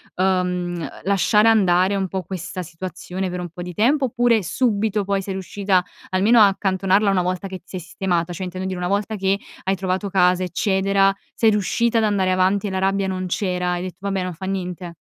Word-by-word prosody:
uhm, 180 -2 -1
lasciare 210 +4 +3
andare 190 -2 +3
un 195 -1 -1
po' 190 0 -4
questa 185 +1 -6
situazione 180 +2 -5
per 180 0 -4
un 175 - -5
po' 175 +2 -9
di 180 -1 -7
tempo? 265 - +3
Oppure, 240 -2 +2
subito 210 +1 0
poi 195 0 0
sei 195 0 -5
riuscita 190 0 0 0.2
almeno 205 +6 +4
a 210 - +8
accantonarla 195 +1 +1
una 185 - +2
volta 185 +2 -2
che 190 -1 -6
ti - - -42
sei 185 - -6
sistemata? 175 -1 -2
Cioè, 185 +2 -5
intendo 185 +1 -5
dire: 185 -1 -4
una 180 - -2
volta 205 +2 -1
che 195 0 +1 0.3
hai 190 +1 +1
trovato 190 +1 -2
casa, 180 -1 +3
eccetera, 195 +2 +2 0.2
sei 225 -1 +4
riuscita 230 +3 +1
ad 220 - +2
andare 195 -3 +1
avanti 190 +2 +2
e - - -1
la 190 - -1
rabbia 195 +1 +1
non 185 -1 -3
c'era, 180 -1 -1
hai 175 0 -3
detto: 185 -1 -7
"Vabbè, 195 -1 -2
non 180 0 -4
fa 175 +4 -8
niente?" 180 -2 -4
190 Hz, 205 wpm, -21 LUFS, 180-200 Hz, 0.3 s, a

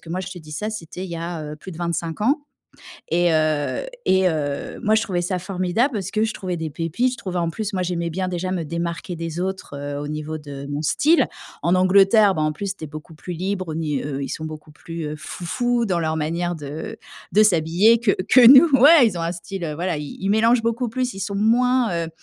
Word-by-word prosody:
que 165 - -12
moi 185 +2 -2
je 185 - -6
te 185 - -8
dis 155 -2 -12
ça, 210 +8 -3
c'était 180 -2 -6
il 180 - -8
y 170 - -4
a, 165 -1 -5
heu, 150 - -8
plus 185 +4 -10
de 165 - -10
25 170 0 -3
ans 280 +8 +2 0.7
et, 175 0 +3
heu, 155 - 0 0.2
et 190 -1 +4
heu, 145 -3 -3
moi 215 - +3
je 220 - +2
trouvais 180 -3 -1
ça 180 +1 -1
formidable 190 +8 0
parce 195 -3 -3
que 215 0 +1
je 225 - -2
trouvais 185 -3 -4
des 160 -1 -3
pépites. 170 - -1
Je - - -5
trouvais 185 -6 -4
en 170 -1 0
plus 210 +5 -4
moi 185 -2 -1
j'aimais 170 -1 -2
bien 185 +3 -2
déjà 180 +1 -3
me 175 -3 -2
démarquer 170 +2 -4
des 165 0 -5
autres, 190 -6 -4
heu, 145 0 -5
au 145 - -5
niveau 155 +1 -4
de 140 -2 -8
mon 145 +1 -3
style. 310 - +3 0.4
En 170 - +2
Angleterre, 195 +2 +5
bah, 155 - -1
en 155 - +2
plus, 195 +5 -4
tu 155 - -8
es - - -5
beaucoup 155 +2 -10
plus 175 +3 -7
libre. 185 +1 -3
Au 155 - -3
ni 150 -4 -2
heu, 140 -1 -4
ils 135 - -4
sont 155 - -5
beaucoup 155 -1 -9
plus, 165 +1 -7
heu, 150 - -4
«foufous» 235 - -1
dans 180 -4 0
leur 160 -1 -1
manière 170 +3 -2
de, 145 - -8
heu, 160 +10 -6 0.4
de 210 - +6
s'habiller 190 +4 +4
que 235 -4 +2 0.2
que 245 0 +7
nous. 275 +6 +9
Ouais, 290 -2 +8
Ils 205 - -1
ont - - -3
un 165 +1 -1
style, 170 -1 -5
voilà 175 -1 -1
i 150 -1 -7
ils 195 - -2
mélangent 225 +3 +3
beaucoup 230 +2 -1
plus. 250 +2 -2
Ils 195 - -7
sont 200 +1 -3
moins 230 -5 +2
heu, - - -7
175 Hz, 250 wpm, -22 LUFS, 160-210 Hz, 0.7 s, nous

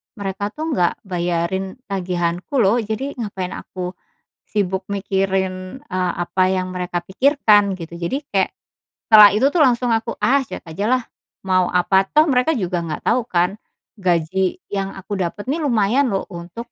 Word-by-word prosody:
mereka 200 0 -3
tuh 315 +1 -3
nggak 175 - 0
bayarin 180 +1 -2
tagihanku 180 +2 -2
loh 210 +5 +3
jadi 225 +6 -3
ngapain 195 -5 -4
aku, 180 -1 -6 0.6
sibuk 190 -2 -1
mikirin," 190 +2 -2
eee, 185 -7 -1
"apa 185 +1 +1
yang 185 -1 -1
mereka 180 -1 -3
pikirkan," 205 - +3
gitu. 170 -2 -9
Jadi 265 - -2
kayak, 195 -1 +1 0.6
setelah 210 -1 +10
itu 265 +6 +3
tuh 350 - +1
langsung 245 -2 +3
aku, 225 +1 0
ah, 275 +2 +4
cuek - - -7
aja 170 +4 -4
lah 255 -1 +2 0.4
mau 185 -1 +2
apa 190 +2 +2
toh 305 +9 +5
mereka 280 +1 +2
juga 180 -5 -1
nggak 160 -2 -5
tau 250 +2 +2
kan, 180 +1 0 0.4
gaji 180 +1 0
yang 195 -1 -3
aku 195 +1 -5
dapat 185 +3 -3
nih 315 - -1
lumayan 250 -1 +2
loh 195 -4 -1
untuk 175 +8 -8
195 Hz, 160 wpm, -20 LUFS, 180-230 Hz, 0.6 s, setelah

